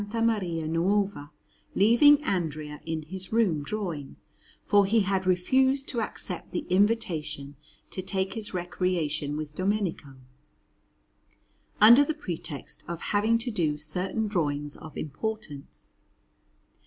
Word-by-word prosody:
Maria 195 -9 0
Nuova, 185 -1 0 0.5
leaving 280 +8 +6
Andrea 155 - -3
in 160 -1 -2
his 190 +4 -7
room 210 -10 +2
drawing, 160 -4 -4 0.5
for 205 -1 +4
he 220 +2 +3
had 190 -1 0
refused 260 +9 +2
to 235 - -1
accept - - -3
the 330 - -3
invitation 165 -9 0 0.4
to 185 - -4
take 190 0 -2
his 215 -1 -5
recreation 170 -5 -2
with 150 -1 -5
Domenico, 185 -7 -2 1.6
under 235 +6 +9
the 305 +2 -2
pretext 165 - -6
of 170 -1 -4
having 215 +3 +3
to 240 +2 -4
do 160 -8 0
certain 180 +8 -1
drawings 145 -7 -1
of 160 - -11
importance. 155 -1 -6
185 Hz, 115 wpm, -27 LUFS, 155-215 Hz, 1.6 s, under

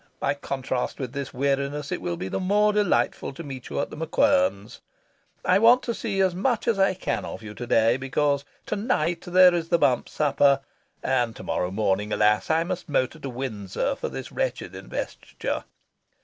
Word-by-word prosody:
By - - +1
contrast 130 -3 -3
with 130 -3 -5
this 140 -2 -4
weariness, 140 +2 -1
it - - -2
will 85 -1 -3
be 95 - -4
the - - -2
more 205 +3 +3
delightful 205 -8 +1
to 165 - -8
meet 135 -4 -8
you - - -3
at - - -2
The - - -7
MacQuern's. 275 - +1 0.6
I 185 +2 +4
want 235 +3 +6
to 235 - -2
see 210 -4 -3
as 190 -2 +3
much 225 +5 0
as 225 -4 +2
I 195 -1 +3
can 115 -10 -2
of - - -7
you 105 -1 -8
to 120 +3 -7
day, 115 0 +4
because 140 +1 0 0.2
to - - -2
night 175 - 0
there 180 0 +7
is 165 -1 -2
the 170 - +4
Bump 125 -7 +2
Supper, 140 -2 +3 0.4
and 120 -3 +1
to - - -9
morrow 90 - -1
morning, 105 +1 0
alas! 105 0 +2
I 160 +1 +3
must 180 -1 -5
motor 140 +2 0
to 140 - -5
Windsor 120 - -3
for - - -4
this - - -7
wretched - - -2
Investiture. - - -5
145 Hz, 190 wpm, -25 LUFS, 125-185 Hz, 0.6 s, there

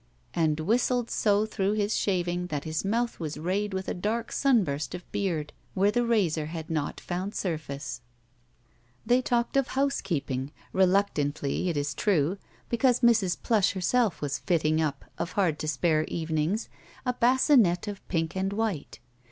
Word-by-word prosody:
And 160 -2 +1
whistled 240 +5 +1
so 210 0 +2
through 200 -2 0
his 210 0 0
Slaving 180 -2 0
that 145 -4 -3
his 155 0 -2
mouth 230 +4 -1
was 155 -3 -4
rayed 190 +6 -1
with 190 0 -3
a - - -1
dark 220 +5 -2
sunburst 180 - +1
of 180 - -8
l^eard 170 -7 -1 0.3
wh^:^ 200 +2 +3
the 240 - +2
razor 180 -10 +1
had 160 0 -6
not 150 -2 -1
fotmd 185 +3 -4
sxirface. 150 -7 -4
GUILTY - - -36 1.0
They 245 +3 +4
talked 240 +1 0
of 275 - +3
housekeeping, 160 - -1 0.2
reluctantly, 180 -5 +1
it 165 - -1
is 145 0 -1
true, 180 +1 +1 0.3
because 245 +1 +2
Mrs. 225 -7 +4
Plush 215 -6 +3
herself 205 +1 +1
was 140 -1 -1
fitting 155 -2 +1
up, 145 -3 -2
of 175 - -3
hard 175 -7 +1
to 155 - -3
spare 155 +1 +2
evenings, 160 +5 -1 0.4
a 250 - +1
basinette 240 - +4
of 205 -2 -6
pink 165 -1 -1
and 190 +1 -1
white. 210 -8 -2
185 Hz, 160 wpm, -28 LUFS, 155-220 Hz, 1.0 s, They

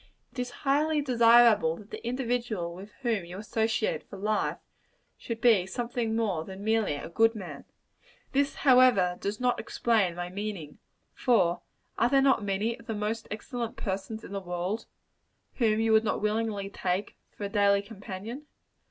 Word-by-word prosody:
It 270 - -9
is 250 0 -2 0.2
highly 300 +3 +2
desirable 235 - +5
that 210 0 -14
the - - -7
individual 235 -7 -2
with 195 +4 -10
whom 225 -6 0
you 175 +2 -9
associate 220 +1 -1
for 200 - -8
life, 210 +2 0 0.6
should 230 -1 -6
be 225 -6 +4
something 235 0 -2
more 200 -8 0
than 190 +3 -9
merely 220 -7 +1
a 145 - -6
good 225 +7 +3
man. 175 -9 -8 0.7
This, 280 +1 +1
however, 250 -10 +5
does 205 +1 -3
not 250 -1 +1
explain 210 -7 +1
my 175 0 -4
meaning. 190 -6 -6 0.3
For 180 -9 +2 0.4
are 235 - +4
there 275 +1 +4
not 270 -5 +3
many 205 +4 -1
of - - -16
the 225 - -2
most 215 +2 -3
excellent 230 +2 -5
persons 200 +2 -4
in - - -10
the 200 -1 -3
world, 180 +4 -3 0.7
whom 220 -3 +2
you 225 0 +2
would 220 0 +5
not 215 - 0
willingly 210 -1 -1
take 185 +1 -2 0.2
for - - -6
a 200 - -2
daily 200 0 +3
companion? 210 +6 -8
215 Hz, 165 wpm, -28 LUFS, 195-235 Hz, 0.7 s, desirable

